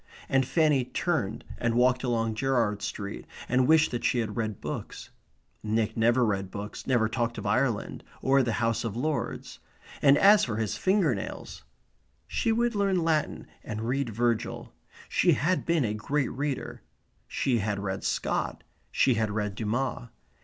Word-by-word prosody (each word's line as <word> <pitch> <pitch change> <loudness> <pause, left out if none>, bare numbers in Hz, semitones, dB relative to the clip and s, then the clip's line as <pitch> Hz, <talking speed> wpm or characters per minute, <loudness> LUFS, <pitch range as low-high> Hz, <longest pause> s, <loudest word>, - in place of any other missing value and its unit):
And 135 -1 +2
Fanny 150 -5 +3
turned 125 - -2 0.2
and 120 -1 0
walked 125 +1 +3
along 115 -3 0
Gerrard 115 -4 0
Street 100 -1 -5 0.2
and 125 +1 +2
wished 160 0 +5
that 120 - -3
she - - +2
had 110 -3 -2
read 110 -4 -2
books. - - -6 0.5
Nick 110 0 -1
never 120 +2 +3
read 100 -3 -1
books, 105 +2 -7
never 120 -4 +3
talked 120 0 -2
of - - -6
Ireland, 115 +1 0 0.2
or 135 +1 +3
the 120 -3 0
House 115 +1 0
of 115 -3 -3
Lords; 150 +4 -3 0.4
and 140 +1 +6
as 205 +4 +6
for 115 - -1
his 110 -2 -1
finger 190 -7 +2
nails! 95 - -7 0.6
She 225 - 0
would 235 +1 +1
learn 195 -4 +1
Latin 155 -2 0 0.2
and 110 +1 -4
read 135 0 0
Virgil. 115 +1 -1 0.3
She - - +3
had 180 +5 0
been 165 -5 +2
a 105 - -1
great 135 +6 -1
reader. 140 +1 -4 0.5
She 125 -4 0
had 105 0 -1
read 95 -1 -4
Scott; - - -2 0.3
she 130 - +3
had 110 -1 0
read 105 -1 -2
Dumas. 120 +3 -2
120 Hz, 160 wpm, -28 LUFS, 110-140 Hz, 0.6 s, and